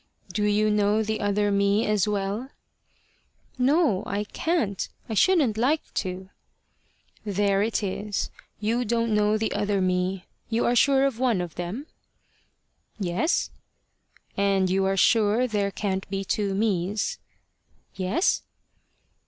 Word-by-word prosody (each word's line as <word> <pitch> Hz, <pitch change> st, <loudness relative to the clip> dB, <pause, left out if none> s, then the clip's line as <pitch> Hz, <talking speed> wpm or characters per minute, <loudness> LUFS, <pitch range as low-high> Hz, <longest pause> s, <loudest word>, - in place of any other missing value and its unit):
"Do 210 Hz, +1 st, 0 dB
you 210 Hz, +1 st, +2 dB
know 210 Hz, +1 st, +2 dB
the 220 Hz, 0 st, -2 dB
other 205 Hz, 0 st, +1 dB
me 200 Hz, +2 st, +2 dB
as 210 Hz, -2 st, +1 dB
well?" 205 Hz, +4 st, -2 dB, 1.1 s
"No. 270 Hz, -, +3 dB
I 200 Hz, +1 st, -1 dB
can't. 215 Hz, -, -1 dB, 0.2 s
I 225 Hz, -, -4 dB
shouldn't 275 Hz, -, +3 dB
like 290 Hz, +6 st, 0 dB
to." 185 Hz, 0 st, -4 dB, 0.9 s
"There 200 Hz, -1 st, +1 dB
it 220 Hz, 0 st, 0 dB
is. 205 Hz, +1 st, -3 dB, 0.3 s
You 225 Hz, +4 st, 0 dB
don't 230 Hz, 0 st, 0 dB
know 210 Hz, 0 st, +3 dB
the 220 Hz, 0 st, -1 dB
other 205 Hz, -1 st, 0 dB
me. 185 Hz, 0 st, 0 dB, 0.2 s
You 230 Hz, +1 st, +1 dB
are 240 Hz, -, +2 dB
sure 270 Hz, +2 st, +4 dB
of 265 Hz, -4 st, -1 dB
one 245 Hz, -6 st, +2 dB
of 175 Hz, -3 st, -4 dB
them?" 180 Hz, +11 st, -5 dB, 1.1 s
"Yes." 190 Hz, -, 0 dB, 0.8 s
"And 195 Hz, -2 st, +2 dB
you 190 Hz, +1 st, +2 dB
are 195 Hz, 0 st, +1 dB
sure 225 Hz, +3 st, +4 dB
there 205 Hz, -4 st, 0 dB
can't 190 Hz, -1 st, -3 dB
be 195 Hz, 0 st, -3 dB
two 200 Hz, -1 st, -1 dB
mes?" 205 Hz, -, -1 dB, 0.7 s
"Yes." 195 Hz, -, +1 dB
210 Hz, 130 wpm, -25 LUFS, 195-225 Hz, 1.1 s, sure